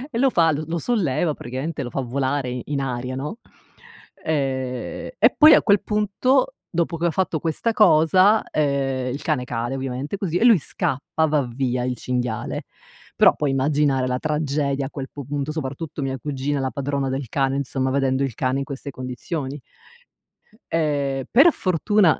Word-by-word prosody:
E - - 0
lo 270 0 +4
fa, 165 -7 +3
lo 155 +1 -2
lo 170 +1 -2
solleva 170 - 0
praticamente, 140 +5 -5
lo 120 - -4
fa 135 - -3
volare 130 0 -2
in 145 -1 -2
aria, 125 -1 -3
no. 150 - -5 0.9
Ehm, 130 -4 -2
e - - +4
poi 310 +1 +8
a - - +3
quel 200 -2 +4
punto, 235 - +1 0.2
dopo 170 -1 -1
che 170 - +1
ho 170 - +1
fatto 175 -2 -1
questa 165 +9 -1
cosa, 185 +2 +5
ehm 135 -3 0
il 140 - -5
cane 150 -6 0
cade 120 +1 -3
ovviamente 135 +6 -4
così, 175 -4 -1
e 225 - +2
lui 225 -8 +7
scappa, 160 0 -1
va 150 -2 +2
via 125 0 -1
il 125 0 -1
cinghiale. 125 -1 -3 0.5
Però - - +6
puoi 150 - -1
immaginare 135 -1 +1
la 125 0 -1
tragedia 145 -2 -1
a 135 - -7
quel 135 -2 -6
pu 140 -3 -8
punto, 145 +1 -3
soprattutto 150 0 -5
mia 135 -1 -3
cugina, 140 +1 -2
la 130 - -1
padrona 140 0 -2
del 135 -1 -3
cane, 135 +3 0
insomma 135 -1 -1
vedendo 135 0 +1
il 130 -5 -3
cane 130 +1 0
in 140 - -3
queste 140 0 -6
condizioni. 130 +3 -5 1.1
Ehm 140 -4 0
per 290 +7 +6
fortuna, 185 0 +2
140 Hz, 175 wpm, -22 LUFS, 130-165 Hz, 1.1 s, poi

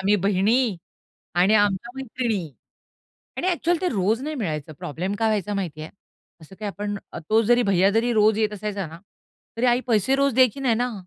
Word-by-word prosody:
आम्ही 200 +2 +3
बहिणी 205 +4 +2 0.6
आणि 185 +5 +4
आमच्या 205 +2 +1
मैत्रिणी. 230 -9 -3 0.9
आणि 365 - -1
अ‍ॅक्चुअली 345 -1 +1
ते 370 - +1
रोज 210 +4 +1
नाही 305 +2 -4
मिळायचं. 155 - -4
प्रॉब्लेम 165 +7 -4
काय 225 - +2
व्हायचा 210 -1 -1
माहितीये. 160 -6 -4 0.5
असं 160 +5 -14
काही 210 - -4
आपण 205 +1 -4
अ, - - -6
तो 220 +1 +4
जरी 240 +2 +3
भैय्या 195 -2 +3
जरी 225 +3 +1
रोज 215 -1 +4
येत 215 -1 +1
असायचा 205 -1 -4
ना, 165 +2 -11 0.6
तरी 240 - +1
आई 245 0 +4
पैसे 230 +3 +2
रोज 275 -1 +2
द्यायची 255 +1 +3
नाही 255 -4 +2
ना. 245 +2 -1
210 Hz, 185 wpm, -23 LUFS, 195-245 Hz, 0.9 s, आणि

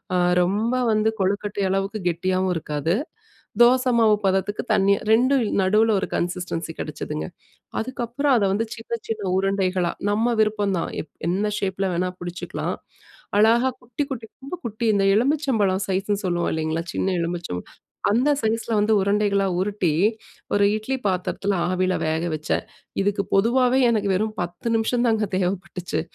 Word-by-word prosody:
அ - - +3 0.3
ரொம்ப 215 +7 0 0.2
வந்து 215 +1 +2
கொழுக்கட்டை 200 +1 -1
அளவுக்கு 195 +3 -1
கெட்டியாவும் 185 +2 0
இருக்காது. 150 +1 -1 0.7
தோச 255 +2 +6
மாவு 220 -2 +5
பதத்துக்கு 195 +2 0
தண்ணீயா 200 -1 +3
2ம் 255 +3 +4 0.2
நடுவுல 215 +4 +3
ஒரு - - -2
கன்சிஸ்டன்சி 175 -2 -3
கெடச்சதுங்க. 80 - -4 0.5
அதுக்கப்புறம் 260 +3 0
அத 210 - +2
வந்து 220 +3 0
சின்ன 230 +1 -5
சின்ன 220 -2 -3
உருண்டைகளா, 190 -2 +1 0.2
நம்ம 230 +3 +1
விருப்பம் 210 -2 +1
தான் - - -3
எப் 155 - -20 0.2
எந்த 200 +4 0
ஷேப்ல 195 0 -1
வேணா 180 +1 0
புடிச்சுக்கலாம். 175 0 -4 0.6
அழகா 235 +4 +4
குட்டி 245 +4 -3
குட்டி 225 -4 -5 0.2
ரொம்ப 275 +6 -6
குட்டி 230 +1 -3
இந்த 195 -1 +2
எலுமிச்சம்பழம் 230 -8 +1
சைஸ்னு 195 +2 -1
சொல்லுவோம் 175 -1 0
இல்லைங்களா? 160 +1 -1
சின்ன 190 - 0
எலுமிச்சம்பழம், 170 - -4 0.4
அந்த 255 +6 +3
சைஸ்ல 225 +1 -1
வந்து 210 +1 +2
உருண்டைகளா 200 0 +2
உருட்டி, 195 -4 0 0.6
ஒரு 205 - +4
இட்லி 255 +5 -2
பாத்ரத்துல 190 +2 -1 0.2
ஆவில 185 0 +1
வேக 160 +1 0
வச்சேன். 155 0 -2 0.4
இதுக்கு 200 0 +1
பொதுவாவே 250 +5 +3
எனக்கு 205 -3 +1
வெறும் 215 +3 -1
10 175 +6 -5
நிமிஷம் 240 +2 +1
தாங்க 220 -1 +2
தேவப்பட்டுச்சு. 180 -3 -2
200 Hz, 140 wpm, -23 LUFS, 185-225 Hz, 0.7 s, தோச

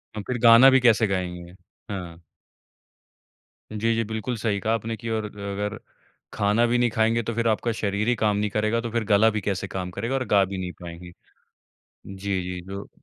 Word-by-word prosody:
हम 105 - -5
फिर 125 - -1
गाना 115 +3 +9
भी 130 0 +5
कैसे 115 -2 +4
गाएँगे। 90 -2 -4 0.4
हाँ। 85 -4 -6 1.5
जी, 115 +2 0
जी। 115 - 0
बिल्कुल 110 +3 -4
सही 105 -2 -1
कहा 110 +4 0
आपने 115 0 -2
कि 115 - -6
और 110 -1 -2
ग 105 - -18 0.2
अगर 105 0 -3 0.6
खाना 105 +2 +2
भी 120 - +2
नहीं 120 0 +2
खाएँगे, 115 0 +2
तो 115 - -3
फिर 115 0 0
आपका 115 +2 +1
शरीर 105 -1 -2
ही 120 - +3
काम 105 -2 +1
नहीं 105 0 0
करेगा, 110 +3 0
तो 115 -1 -5
फिर 115 -1 0
गला 105 +2 +4
भी 110 -1 -2
कैसे 95 0 -2
काम 90 -2 -5
करेगा 115 +8 -3
और 130 -1 -1
गा 100 -1 +4
भी 95 0 -6
नहीं 90 -1 -4
पाएँगे। 85 +1 -9 1.0
जी, 95 -1 -3
जी, 90 0 -5
जो 100 +1 -7
105 Hz, 205 wpm, -24 LUFS, 95-115 Hz, 1.5 s, गाना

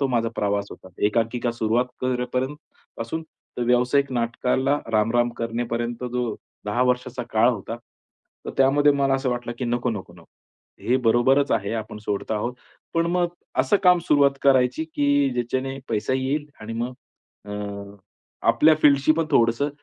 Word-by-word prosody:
तो 140 - +2
माझा 115 -3 0
प्रवास 100 -1 0
होता. 95 - -12 0.2
एकांकिका 115 +2 0
सुरुवात 115 +2 +1
करेपर्यंत 130 +2 -1 0.4
पासून 115 +8 -4
तर 140 -5 -9
व्यावसायिक 125 +3 +2
नाटकाला 125 +4 0
रामराम 115 +3 +2
करणेपर्यंत 120 +1 -3
जो 125 -3 -1 0.3
10 105 +4 0
वर्षाचा 125 0 -6
काळ 110 +2 +4
होता, 115 0 -5 0.7
तर - - -3
त्यामध्ये 145 +2 +5
मला 140 -1 +2
असं 135 -1 0
वाटलं, 120 -1 -3
की 125 - -2
नको, 120 0 0
नको, 95 -5 -6
नको 85 -2 -17 0.5
हे 125 +2 +2
बरोबरच 130 +3 +3
आहे, 105 -1 0
आपण 110 -1 -5
सोडत 105 -1 -3
आहोत. 120 +4 -2 0.4
पण 165 0 +2
मग 175 0 +1 0.3
असं 205 - +3
काम 180 -2 +6
सुरुवात 140 -1 +5
करायची, 130 +2 +3
की 145 -3 +2
ज्याच्याने 130 +3 -2
पैसा 110 +2 -1
येईल 135 +3 -1
आणि 110 +1 -6
मग 120 +2 -3 0.5
अ, 105 - -10 1.0
आपल्या 150 +7 +6
फील्डशी 140 +1 +5
पण 165 0 0
थोडंसं 115 +5 +3
125 Hz, 150 wpm, -24 LUFS, 115-140 Hz, 1.0 s, काम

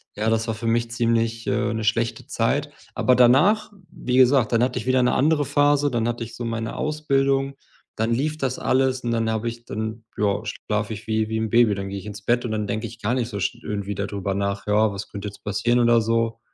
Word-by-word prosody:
ja, 110 +2 0
das 110 0 +1
war 115 - -1
für 115 +1 -5
mich 115 0 +1
ziemlich 115 -1 0
äh, 120 -3 0
'ne 110 0 -3
schlechte 115 +2 -1
Zeit. - - 0 0.2
Aber 125 - +3
danach, 150 - +4 0.2
wie 125 0 -2
gesagt, 130 -2 +5
dann 115 +1 +3
hatte 125 0 0
ich - - -7
wieder 130 0 +3
'ne 125 - +2
andere 150 +2 +3
Phase, 145 0 +3
dann 115 -1 0
hatte 120 0 -2
ich 115 - -9
so 120 - -5
meine 115 0 -3
Ausbildung, 140 -3 0 0.4
dann 110 +1 -1
lief 150 +5 -1
das 130 -3 -2
alles 130 0 +1
und 120 - -3
dann 115 -1 0
habe 110 +1 -2
ich 120 0 -10
dann 110 +1 -5
ja, 100 -1 +1
schlafe 105 +1 -3
ich 105 +2 -9
wie 110 0 0
wie 110 - -1
'n 110 -1 -1
Baby. 115 -3 +4
Dann 95 0 -5
gehe 100 - -5
ich 95 - -12
ins 105 +1 -8
Bett 120 +2 +1
und 110 - -3
dann 105 -1 -2
denke 110 +3 -2
ich 115 +1 -13
gar 115 +5 0
nicht 120 -2 -1
so 100 -3 -5
sch 90 - -1
irgendwie 100 -1 -3
da 100 - -2
drüber 100 -1 -3
nach: 100 +1 -2
„Ja, 105 0 +3
was 100 +2 -6
könnte 100 0 -6
jetzt 100 - -16
passieren?“, 110 +4 +1
oder 120 -1 +5
so. 115 0 0
115 Hz, 245 wpm, -23 LUFS, 110-125 Hz, 0.4 s, gesagt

